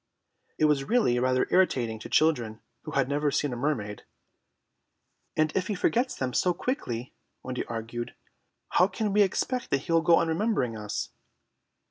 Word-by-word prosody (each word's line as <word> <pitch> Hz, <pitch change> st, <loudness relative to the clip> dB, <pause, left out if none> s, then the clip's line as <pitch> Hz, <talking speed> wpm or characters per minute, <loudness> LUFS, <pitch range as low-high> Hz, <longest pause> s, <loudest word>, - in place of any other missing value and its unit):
It 155 Hz, -, +3 dB
was 150 Hz, -2 st, +3 dB
really 220 Hz, -, +3 dB
rather 130 Hz, 0 st, +2 dB
irritating 125 Hz, -12 st, +2 dB
to -, -, -9 dB
children 120 Hz, -9 st, +2 dB, 0.3 s
who 155 Hz, -, -5 dB
had 135 Hz, -2 st, +2 dB
never 145 Hz, +1 st, +1 dB
seen 145 Hz, -1 st, 0 dB
a -, -, -3 dB
mermaid. 120 Hz, -6 st, -2 dB, 1.3 s
"And 155 Hz, 0 st, +1 dB
if 185 Hz, -1 st, 0 dB
he 210 Hz, -, -1 dB
forgets 245 Hz, +7 st, +1 dB
them 130 Hz, -2 st, -3 dB
so 180 Hz, +5 st, +2 dB
quickly," 125 Hz, -, -3 dB, 0.3 s
Wendy 125 Hz, 0 st, -3 dB
argued, 115 Hz, +1 st, -5 dB, 0.5 s
"how 180 Hz, -, +4 dB
can 205 Hz, +1 st, -2 dB
we 210 Hz, -, +5 dB
expect 245 Hz, +6 st, 0 dB
that 135 Hz, -, +1 dB
he 160 Hz, -, -6 dB
will 165 Hz, 0 st, +4 dB
go 165 Hz, +1 st, +5 dB
on 165 Hz, -, +2 dB
remembering 165 Hz, -, 0 dB
us?" 105 Hz, -1 st, -4 dB
145 Hz, 165 wpm, -27 LUFS, 120-180 Hz, 1.3 s, we